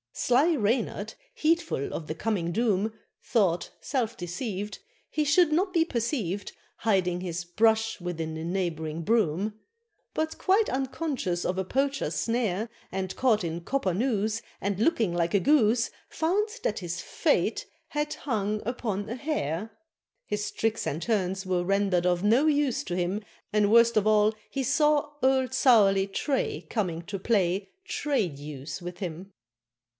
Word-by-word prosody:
Sly 285 +7 +3
Reynard, 220 -3 0 0.2
heedful 330 - 0
of 155 - -5
the 155 - -3
coming 180 -3 -1
doom, 215 0 +1 0.3
Thought, 185 -7 +1
self 240 -5 -1
deceived, 195 +3 -4 0.3
He 305 - 0
should 305 +3 +4
not 370 +4 +1
be 330 -2 +4
perceived, 230 - -2 0.3
Hiding 185 -5 +1
his 175 -1 -4
brush 220 +3 +2
within 165 -2 -3
a 160 - -5
neighboring 165 -3 -2
broom! 210 0 +1 0.5
But 315 0 -2
quite 400 +3 +3
unconscious 260 - -2
of 180 - -1
a 190 - +1
Poacher's 270 - -1
snare, 220 +3 0 0.2
And 190 0 -3
caught 225 -6 +2
in 170 0 -3
copper 195 -1 0
noose, 220 0 0 0.2
And 200 0 -2
looking 225 - +2
like 170 -1 0
a - - +5
goose, 240 -2 +3 0.2
Found 385 +7 +1
that 210 - 0
his 175 -1 -4
fate 180 +4 0 0.2
had 295 0 -1
"hung 215 -5 -1
upon 215 -4 -2
a 230 - -4
hare"; 225 - -2 0.6
His 210 0 -2
tricks 225 0 -1
and 155 +4 -2
turns 190 -3 0
were 180 -1 0
rendered 195 -2 +1
of 175 0 +1
no 235 +9 +4
use 290 -4 +2
to 175 - -3
him, 180 +4 -1 0.3
And 210 -1 +3
worst 235 0 +6
of 215 -1 +3
all 215 0 +4 0.2
he 275 - -2
saw 295 +2 +2
old 260 0 +2
surly 200 -7 +5
Tray 265 +7 -1
Coming 175 -7 -1
to 200 +3 -5
play 195 -2 +1 0.2
Tray 280 - 0
Deuce 145 0 -7
with 175 0 -6
him. 185 +1 -6
210 Hz, 150 wpm, -27 LUFS, 180-255 Hz, 0.6 s, worst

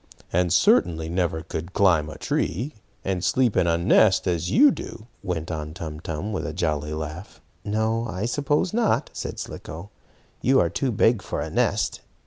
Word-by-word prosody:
And 90 +1 +3
I - - -4
certainly 80 0 +3
never 85 -2 -1
could 85 +4 -6
climb 85 -6 +3
a 75 - -8
tree, 120 - -2 0.3
and 95 -2 -1
sleep 125 +1 +2
in 85 - +3
a 85 0 +3
nest, 95 +3 +4
as 85 -1 0
you 285 +3 +6
do," 115 - -7 0.2
went 85 -4 -3
on 75 -1 -5
Tum 80 -4 -6
Tum, 80 +7 -4
with 95 - -2
a 75 - -4
jolly 75 -3 -1
laugh. 80 +5 -7 0.2
"No, 110 +2 0
I 100 0 -3
suppose 145 +7 0
not," 230 -1 +1
said - - -5
Slicko. 85 +7 -8 0.5
"You 135 +1 +4
are 85 - +2
too 130 +8 -1
big 115 0 +3
for - - -4
a - - -4
nest. - - 0
90 Hz, 180 wpm, -24 LUFS, 80-110 Hz, 0.5 s, you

